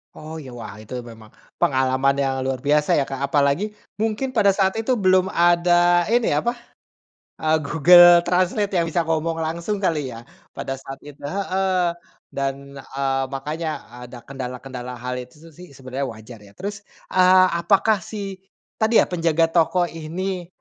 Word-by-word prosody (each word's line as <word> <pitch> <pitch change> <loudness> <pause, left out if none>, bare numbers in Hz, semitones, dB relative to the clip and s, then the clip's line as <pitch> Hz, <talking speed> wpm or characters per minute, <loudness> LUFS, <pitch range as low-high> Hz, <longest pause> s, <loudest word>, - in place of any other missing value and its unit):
Oh, 155 +1 -9
iya. 140 -4 -10
Wah, 115 -6 -8
itu 110 +3 -11
memang 115 -2 -13 0.3
pengalaman 130 0 +2
yang 135 -1 0
luar 130 -1 -2
biasa 150 +1 +2
ya, 145 - +2
Kak, 135 -1 -6
apalagi 145 +9 +1 0.2
mungkin 225 +4 -1
pada 210 -5 +4
saat 190 -1 +2
itu 250 +3 0
belum 185 -3 +3
ada 175 0 +3
ini, 235 +1 +2
apa, 235 +12 0 0.9
eee, 155 0 +3
Google 175 +3 +7
Translate 185 +3 0
yang 165 - +1
bisa 165 +1 0
ngomong 165 0 -1
langsung 170 +6 -3
kali 150 -8 -1
ya 115 - -10 0.3
pada 135 0 -5
saat 135 0 -9
itu, 145 -1 -13
heeh, 190 0 0 0.4
dan, 135 0 -2 0.2
eee, 135 0 -2
makanya 155 +4 -4 0.4
ada 120 0 -11
kendala-kendala 125 -1 -7
hal 125 +1 -5
itu 125 0 -10
su 165 - -13
sih 180 +3 -14
sebenarnya 135 +1 -5
wajar 110 +1 -12
ya. 100 -1 -17
Terus, 200 +1 -7 0.2
eee, 185 0 +6
apakah 200 +5 +3
si, 195 0 -7 0.4
tadi 220 +1 +4
ya, - - -2
penjaga 165 -2 +1
toko 175 +1 +2
ini, 175 +3 -5
165 Hz, 155 wpm, -22 LUFS, 135-185 Hz, 0.9 s, Google